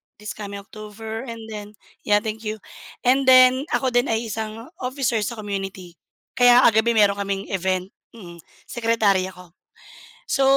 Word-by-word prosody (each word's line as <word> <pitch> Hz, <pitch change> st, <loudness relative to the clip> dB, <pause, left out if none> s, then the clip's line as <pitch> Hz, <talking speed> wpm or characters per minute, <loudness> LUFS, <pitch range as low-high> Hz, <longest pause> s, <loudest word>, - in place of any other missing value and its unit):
this 210 Hz, 0 st, -8 dB
coming 200 Hz, -1 st, -7 dB
October 220 Hz, +3 st, -8 dB
and 230 Hz, -1 st, -7 dB
then 210 Hz, 0 st, -8 dB, 0.3 s
yeah, 205 Hz, 0 st, +4 dB
thank 220 Hz, 0 st, -5 dB
you, 215 Hz, -, -2 dB, 0.5 s
and 260 Hz, +2 st, +3 dB
then, 255 Hz, +3 st, +6 dB
ako 260 Hz, -2 st, 0 dB
din 245 Hz, 0 st, +2 dB
ay 225 Hz, 0 st, -2 dB
isang 220 Hz, +1 st, -5 dB, 0.2 s
officer 250 Hz, -3 st, -1 dB
sa 235 Hz, +3 st, -3 dB
community. 195 Hz, -4 st, -6 dB, 0.4 s
Kaya 245 Hz, 0 st, +7 dB
kagabi 225 Hz, +1 st, +2 dB
meron 205 Hz, -2 st, +4 dB
kaming 200 Hz, 0 st, -2 dB
event, 185 Hz, 0 st, -1 dB, 0.2 s
mm, 175 Hz, -5 st, -12 dB, 0.2 s
secretary 220 Hz, -5 st, +1 dB
ako. 180 Hz, -2 st, -13 dB, 0.8 s
So, 270 Hz, -, +1 dB
215 Hz, 150 wpm, -22 LUFS, 200-235 Hz, 0.8 s, Kaya